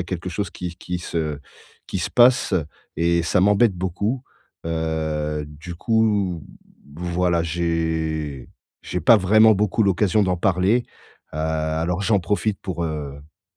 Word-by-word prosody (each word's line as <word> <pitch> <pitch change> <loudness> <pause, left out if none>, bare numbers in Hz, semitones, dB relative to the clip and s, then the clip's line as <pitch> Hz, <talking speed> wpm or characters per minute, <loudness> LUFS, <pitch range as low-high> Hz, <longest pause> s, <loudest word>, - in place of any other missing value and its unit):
a - - -2
quelque 90 +1 -5
chose 95 +1 -3
qui 90 0 -6
qui 90 0 -5
se 80 -4 -3 0.5
qui - - -3
se - - -2
passe 120 -2 +4 0.4
et 85 +1 +2
ça 85 +2 +1
m'embête 105 +2 +4
beaucoup. 100 +8 -2 0.4
Heu, 80 -2 -2
du 80 +4 -9
coup, 105 -5 +1 0.5
voilà, 85 -1 0
j'ai 80 -4 -2 0.3
j'ai 90 - -3
pas 115 +2 +6
vraiment 110 +3 +5
beaucoup 105 +2 +1
l'occasion 100 +1 +2
d'en 90 -2 +1
parler, 95 +6 +2 0.5
heu, - - -5
alors 80 +3 -1
j'en 100 -1 +2
profite 105 +2 -1
pour, 85 -3 -4
heu, 75 -3 -4
p 80 +9 -23
90 Hz, 140 wpm, -22 LUFS, 80-100 Hz, 0.5 s, pas